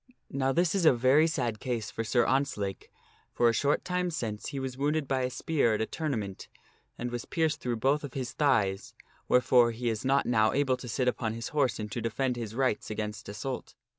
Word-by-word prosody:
" -, -, -49 dB
Now 135 Hz, 0 st, +1 dB
this 170 Hz, +3 st, +2 dB
is 195 Hz, -3 st, +1 dB
a -, -, +8 dB
very 130 Hz, +6 st, +4 dB
sad 120 Hz, -8 st, -2 dB
case 115 Hz, -5 st, -3 dB
for 115 Hz, -, -3 dB
Sir 120 Hz, +1 st, +2 dB
Ontzlake, 120 Hz, -8 st, -1 dB, 0.4 s
for 120 Hz, -, +3 dB
a -, -, +1 dB
short 145 Hz, +6 st, +1 dB
time 180 Hz, -1 st, 0 dB
since 115 Hz, -10 st, -4 dB
he 140 Hz, -, -4 dB
was 130 Hz, -1 st, -4 dB
wounded 145 Hz, +2 st, 0 dB
by 135 Hz, -1 st, 0 dB
a 125 Hz, -, 0 dB
spear 130 Hz, -4 st, +1 dB
at -, -, -2 dB
a -, -, +1 dB
tournament 110 Hz, -, -4 dB, 0.5 s
and 120 Hz, 0 st, -4 dB
was 120 Hz, -1 st, -4 dB
pierced 160 Hz, -2 st, 0 dB
through 120 Hz, -1 st, -1 dB
both 135 Hz, +6 st, +1 dB
of 145 Hz, -, -7 dB
his 130 Hz, -2 st, -3 dB
thighs, 105 Hz, -10 st, +1 dB, 0.3 s
wherefore 125 Hz, -1 st, +5 dB
he 120 Hz, +1 st, -2 dB
is 110 Hz, -2 st, -3 dB
not 135 Hz, +1 st, +2 dB
now 110 Hz, -2 st, +3 dB
able 135 Hz, -2 st, +2 dB
to 125 Hz, -, -9 dB
sit 125 Hz, +2 st, -1 dB
upon 115 Hz, -3 st, 0 dB
his 115 Hz, +1 st, -5 dB
horse 145 Hz, -4 st, +1 dB
and 105 Hz, -1 st, -5 dB
to 120 Hz, -, -3 dB
defend 125 Hz, +3 st, -1 dB
his 115 Hz, -2 st, -5 dB
rights 130 Hz, -5 st, 0 dB
against 105 Hz, 0 st, -5 dB
assault. 120 Hz, +6 st, -5 dB
125 Hz, 220 wpm, -29 LUFS, 115-140 Hz, 0.5 s, a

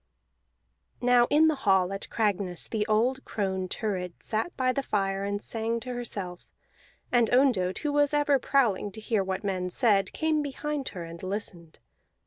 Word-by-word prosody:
Now 245 Hz, -1 st, +4 dB
in 310 Hz, +2 st, +5 dB
the 315 Hz, -, +3 dB
hall 190 Hz, -1 st, +3 dB
at 195 Hz, -, -4 dB
Cragness 200 Hz, -5 st, 0 dB
the 215 Hz, -2 st, -1 dB
old 240 Hz, +5 st, +1 dB
crone 190 Hz, -3 st, -2 dB
Thurid 185 Hz, -4 st, -4 dB
sat 220 Hz, +11 st, -2 dB
by 255 Hz, -1 st, +2 dB
the 275 Hz, -, -1 dB
fire 195 Hz, -5 st, -1 dB
and 200 Hz, 0 st, -2 dB
sang 225 Hz, +2 st, -2 dB
to 250 Hz, +1 st, -5 dB
herself; 200 Hz, -7 st, -5 dB, 0.7 s
and 240 Hz, -2 st, +4 dB
Ondott, 245 Hz, -8 st, +3 dB
who 290 Hz, -, +1 dB
was 290 Hz, -1 st, +3 dB
ever 290 Hz, -2 st, +3 dB
prowling 230 Hz, -7 st, +1 dB
to 220 Hz, -, -8 dB
hear 215 Hz, -2 st, 0 dB
what 190 Hz, +1 st, -3 dB
men 185 Hz, -2 st, -1 dB
said, 200 Hz, -2 st, +2 dB
came 315 Hz, -1 st, 0 dB
behind 290 Hz, 0 st, -3 dB
her 175 Hz, -, -4 dB
and 170 Hz, 0 st, -9 dB
listened. 185 Hz, -4 st, -5 dB
215 Hz, 165 wpm, -28 LUFS, 190-255 Hz, 0.7 s, in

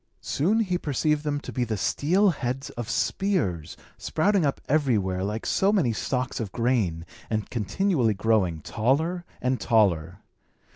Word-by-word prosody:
Soon 200 Hz, +11 st, +1 dB
he 180 Hz, -4 st, 0 dB
perceived 150 Hz, 0 st, 0 dB
them 145 Hz, -1 st, -1 dB
to -, -, -7 dB
be 125 Hz, -, 0 dB
the 110 Hz, -3 st, -2 dB
steel 175 Hz, -, +2 dB
heads 135 Hz, -3 st, -4 dB
of 120 Hz, -2 st, -6 dB
spears, 145 Hz, -, -1 dB, 0.2 s
sprouting 195 Hz, +3 st, +1 dB
up 140 Hz, -, -2 dB
everywhere 105 Hz, -11 st, +1 dB
like 105 Hz, +3 st, -3 dB
so 195 Hz, +1 st, +2 dB
many 160 Hz, -, +2 dB
stalks 125 Hz, +4 st, -2 dB
of 110 Hz, -5 st, -4 dB
grain, 110 Hz, -10 st, 0 dB, 0.2 s
and 110 Hz, -2 st, -2 dB
continually 120 Hz, -, +1 dB
growing 95 Hz, -6 st, +1 dB
taller 160 Hz, -, 0 dB, 0.2 s
and 125 Hz, 0 st, 0 dB
taller. 90 Hz, -6 st, +2 dB
125 Hz, 145 wpm, -26 LUFS, 105-155 Hz, 0.2 s, steel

